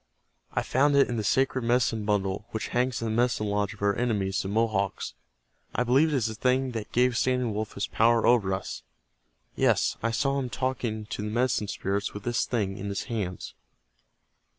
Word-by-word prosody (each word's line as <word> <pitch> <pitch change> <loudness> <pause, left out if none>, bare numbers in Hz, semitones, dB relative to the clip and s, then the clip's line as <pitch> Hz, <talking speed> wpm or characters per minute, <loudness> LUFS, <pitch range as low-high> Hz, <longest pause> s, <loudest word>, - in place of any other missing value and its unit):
"I - - 0
found 140 +2 +2
it 140 - +5
in 120 - -2
the 110 - -1
sacred 135 +4 +2
Medicine 115 -2 +1
Bundle, 100 0 -1
which 110 - -4
hangs 125 -1 0
in - - -1
the 110 - -1
Medicine 120 -2 +1
Lodge 105 +1 -1
of 100 - -9
our 100 -1 +3
enemies, 100 -6 0
the - - -5
Mohawks. 100 - 0 0.6
I 125 - +2
believe 130 +6 +4
it 150 - 0
is 125 -5 +1
the 110 - -2
thing 130 +3 +1
that 110 -3 -5
gave 125 0 +3
Standing 125 -2 +1
Wolf 105 0 -3
his 100 - -2
power 115 +1 +3
over 115 -6 +4
us. 95 0 -4 0.7
Yes, - - +2
I 115 - +1
saw 135 +4 0
him 130 -2 -3
talking 120 -4 -2
to 105 -1 -5
the 105 - -3
Medicine 120 -2 +1
Spirits 100 +1 -2
with 105 - -6
this 120 0 0
thing 100 -5 -1
in 100 - -4
his 100 - -2
hands." 105 -7 -4
115 Hz, 195 wpm, -27 LUFS, 105-125 Hz, 0.7 s, it